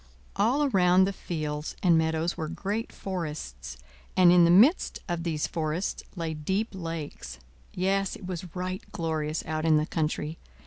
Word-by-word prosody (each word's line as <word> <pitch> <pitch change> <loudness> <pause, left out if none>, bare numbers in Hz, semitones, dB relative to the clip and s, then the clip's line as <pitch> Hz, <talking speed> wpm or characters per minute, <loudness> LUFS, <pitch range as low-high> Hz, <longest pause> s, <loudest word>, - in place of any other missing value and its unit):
All 235 +9 +2
around 185 -6 +4
the 200 - -2
fields 155 -4 -4
and 175 -3 +5
meadows 160 +1 +1
were 160 -3 -3
great 200 +7 -3
forests, 150 - -5 0.4
and 180 -2 +7
in 175 -1 +7
the - - +4
midst 230 - +5
of 175 -2 -2
these 160 -3 -1
forests 160 +3 -2
lay 165 -3 -3
deep 190 +9 -1
lakes. 165 - -6 0.4
Yes, 195 +1 +1
it 195 - -10
was 180 -1 -6
right 185 +1 -3
glorious 155 -2 -2
out 155 0 -2
in 160 -1 +5
the 150 - +1
country. 155 -1 -2
170 Hz, 160 wpm, -28 LUFS, 155-185 Hz, 0.4 s, and